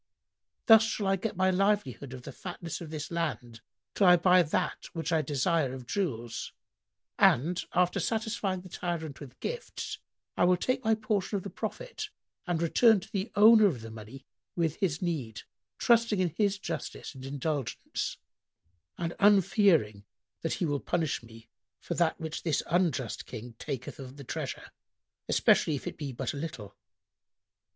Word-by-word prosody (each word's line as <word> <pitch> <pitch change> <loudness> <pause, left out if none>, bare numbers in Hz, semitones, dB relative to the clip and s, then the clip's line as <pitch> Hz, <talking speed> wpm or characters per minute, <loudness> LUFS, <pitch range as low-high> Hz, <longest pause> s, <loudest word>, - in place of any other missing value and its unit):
Thus 225 -2 +9
shall 220 -2 -1
I 195 0 +3
get 205 +4 -3
my 185 +1 +3
livelihood 185 - 0
of 125 -1 -8
the - - -7
fatness 175 -3 -6
of 165 - -7
this 155 0 -5
land, 125 -9 -3 0.3
till 195 - +4
I 180 - +9
buy 180 +1 +5
that 160 -2 -1
which 165 0 -3
I 160 - +3
desire 145 -1 0
of 130 -2 -9
jewels; 120 - -3 0.7
and, 170 +9 +4
after 180 0 +3
satisfying 215 -4 -1
the 185 - -12
tyrant 165 -5 -4
with 135 -3 -11
gifts, 485 0 -5 0.4
I - - +3
will 180 0 +4
take 255 +7 -1
my 220 -1 +3
portion 215 -2 -1
of 190 - -5
the 200 - -6
profit - - -5 0.4
and 175 -2 0
return 220 +6 +5
to - - -13
the 200 +3 -2
owner 215 0 +8
of 135 - -2
the 115 0 -8
money 110 +5 -10 0.3
with 165 -3 0
his 170 -3 -1
need, 135 -11 -3 0.3
trusting 230 -4 +3
in 180 -2 +2
his 200 +4 0
justice 200 - -5
and 130 -2 -11
indulgence, 140 -2 -3 0.8
and 170 0 -2
unfearing 190 - +4 0.4
that 165 - -1
he 175 - -1
will 145 -2 0
punish 160 -5 -1
me 115 -1 -14 0.3
for - - -4
that 170 0 +1
which 160 -1 -4
this 160 -4 0
unjust 155 - 0
King 120 0 -8
taketh 135 0 -5
of 130 0 -9
the 140 - -8
treasure, - - -5 0.6
especially 155 - +4
if 140 - -6
it - - -4
be 145 -3 -5
but 130 +2 -3
a - - -6
little." 135 -10 -6
165 Hz, 165 wpm, -29 LUFS, 135-195 Hz, 0.8 s, Thus